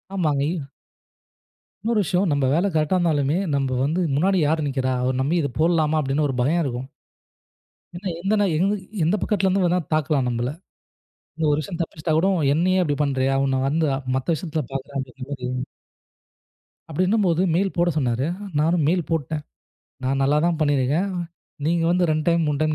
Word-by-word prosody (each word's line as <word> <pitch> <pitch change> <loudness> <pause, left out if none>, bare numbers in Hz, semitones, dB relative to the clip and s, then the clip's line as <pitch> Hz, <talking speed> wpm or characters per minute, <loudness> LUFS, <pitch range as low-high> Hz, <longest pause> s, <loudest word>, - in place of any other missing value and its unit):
ஆமாங்க. 150 -7 +1
இ 160 -6 -4 1.2
இன்னொரு 225 -1 +2
விஷயம் 180 +2 +1
நம்ப 140 -2 +1
வேலை 175 +6 +2
கரெக்டா 155 +3 +2
இருந்தாலுமே, 150 -4 +1 0.2
நம்ப 135 -2 0
வந்து 160 +6 0
"முன்னாடி 190 +6 +2
யாரு 155 +2 +1
நிக்கிறா? 130 -1 -1
அவர 130 +1 +1
நம்பி 145 +6 +1
இத 140 - -1
போடலாமா?" 160 -1 +2
அப்படின்னு 145 +1 0
ஒரு 135 - -3
பயம் 160 +7 +2
இருக்கும். 130 -2 -4 1.1
ஏன்னா 185 +3 -6
எந்த 195 +4 0
நா 205 - +3
எங்கு 195 +6 +2 0.3
எந்தப் 180 +6 +1
பக்கத்துல 195 -2 +1
இருந்து 195 +1 +1
வந்தா 175 +1 +2
தாக்கலாம் 150 -3 +1
நம்பள! 120 +1 -1 0.9
இந்த 160 0 -1
ஒரு 145 - +1
விஷயம் 170 +2 -5
தப்பிச்சிட்டா 160 -1 -3
கூட, 170 +4 +3 0.3
"என்னையே 185 +4 +2
அப்படி 145 -5 0
பண்றியா? 135 -1 +1
உன்ன 135 -1 0
வந்து 160 +3 +1
அ - - -2 0.2
மத்த 130 - -2
விஷயத்துல 155 -1 -3
பாக்குறேன்" 135 +1 -5
அப்டிங்குற 130 0 -7
மாரி 125 -3 -4 1.4
அப்படின்னும் 185 +7 +1
போது 170 0 +2
மெயில் 195 +2 +1
போடச் 175 -2 +2
சொன்னாரு. 125 -2 0 0.3
நானும் 160 0 +2
மெயில் 175 0 +1
போட்டேன். 155 -1 -2 0.6
நான் 135 +1 0
நல்லா 145 +2 +3
தான் 170 -2 0
பண்ணீ 145 -2 +3
இருக்கேன். 145 +10 +1 0.6
நீங்க 165 +1 +1
வந்து 175 -1 +2
2 155 -1 0
டைம் 170 -1 +3
3 145 -1 0
டைம் 155 0 +1
155 Hz, 175 wpm, -23 LUFS, 140-175 Hz, 1.4 s, நா